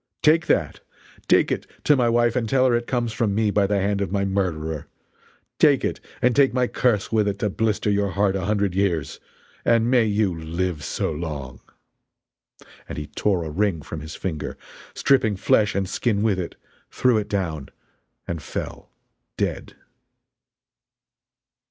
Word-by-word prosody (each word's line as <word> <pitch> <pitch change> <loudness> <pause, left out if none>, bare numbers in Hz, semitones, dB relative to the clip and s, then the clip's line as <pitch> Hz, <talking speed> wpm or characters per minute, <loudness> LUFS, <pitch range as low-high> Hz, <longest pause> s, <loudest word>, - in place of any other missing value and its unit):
Take 160 +2 +4
that! - - +1 0.5
take - - +4
it - - -2 0.2
to 150 - +5
my 125 -3 +2
wife 120 0 +2
and 115 -4 -1
tell 130 +1 +3
her 125 - +3
it 120 0 -2
comes 120 -3 -1
from 110 -3 0
me 110 -1 +2
by 100 -1 +2
the 100 0 +1
hand 100 +1 0
of 95 -3 -2
my 100 -1 0
murderer! 80 -6 -2 0.7
Take - - +4
it - - -2 0.2
and 125 -1 +4
take 135 -3 +4
my 125 -1 +3
curse 120 -4 0
with 110 -2 +2
it 100 -1 -1
to 105 0 -1
blister 105 0 0
your 100 0 +1
heart 100 0 +1
a 95 -1 -2
hundred 100 -2 0
years 90 -7 -1 0.4
and 115 +1 +3
may 125 -3 +4
you 105 -3 +1
live 80 0 -3
so - - -2
long!" 75 -6 -6 1.3
And - - -6
he 75 - -4
tore 95 +2 0
a 80 - -5
ring 90 -2 0
from 80 - -6
his 80 +1 -8
finger, 80 -5 -4 0.4
stripping 115 -7 +3
flesh 105 +2 +2
and 100 -1 0
skin 105 +1 0
with 105 -4 +2
it, 90 - -5 0.3
threw 125 -4 +2
it 105 - -5
down 80 -8 -2 0.6
and 85 -2 -4
fell - - -6 0.5
dead! - - -3
100 Hz, 170 wpm, -23 LUFS, 85-115 Hz, 1.3 s, to